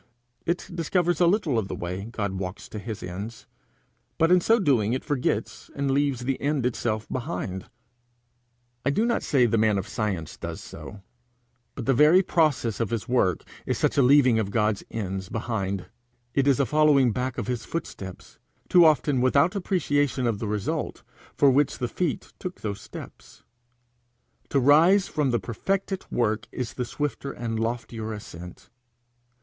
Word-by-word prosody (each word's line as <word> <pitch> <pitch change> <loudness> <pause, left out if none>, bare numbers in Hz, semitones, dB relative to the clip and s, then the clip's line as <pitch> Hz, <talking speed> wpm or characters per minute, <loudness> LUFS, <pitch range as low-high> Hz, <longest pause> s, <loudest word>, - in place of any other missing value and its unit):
It 170 +2 -1
discovers 175 0 0
a 175 - +6
little 170 - +2
of 100 - -3
the - - -4
way 90 +3 -4
God 105 -4 -3
walks 95 0 -5
to 105 - -6
his 105 0 -6
ends, 100 +6 -7 0.7
but 165 +1 +3
in 180 -1 +6
so 225 +6 +4
doing 125 - +2
it 130 - -3
forgets 145 -5 -2
and 140 -1 0
leaves 140 -2 +1
the 130 +1 -2
end 140 -3 0
itself 115 -3 -1
behind. 120 - -4 1.1
I 140 - +2
do 210 +11 +2
not 235 - +1
say 130 -4 +3
the 115 -1 +2
man 110 -2 +3
of 95 +1 -3
science 100 -7 -3
does - - -6
so, 100 -1 -10 0.7
but 125 - -5
the 135 - +3
very 155 +8 +6
process 150 - +1
of 115 -4 0
his 115 0 -3
work 105 -9 +1 0.2
is - - 0
such - - +1
a 140 - +4
leaving 130 -3 +5
of 105 -3 -1
God's 105 -1 0
ends 95 -3 -4
behind. 100 -4 -2 0.5
It 140 +1 +2
is 140 -2 +4
a 140 - +3
following 145 -2 +4
back 125 +2 -3
of 120 - -2
his 120 -3 -3
footsteps, 95 - -7 0.3
too 175 -1 +7
often 145 -4 +3
without 140 +9 +3
appreciation 145 -8 0
of 115 -4 0
the 110 - -3
result 105 -1 -3 0.3
for 140 -2 +5
which 140 +1 +2
the 125 - -2
feet 165 +4 -3
took 180 -1 -6
those 100 -2 -4
steps. - - -11 1.1
To 140 - +2
rise 160 +9 +5
from 150 -3 0
the 120 -2 +1
perfected 195 - -2
work 110 -2 0
is 125 -3 -4
the 125 - -3
swifter 140 +1 -3
and 115 -3 -4
loftier 115 -1 -3
ascent. 90 -5 -10
125 Hz, 170 wpm, -26 LUFS, 110-145 Hz, 1.1 s, too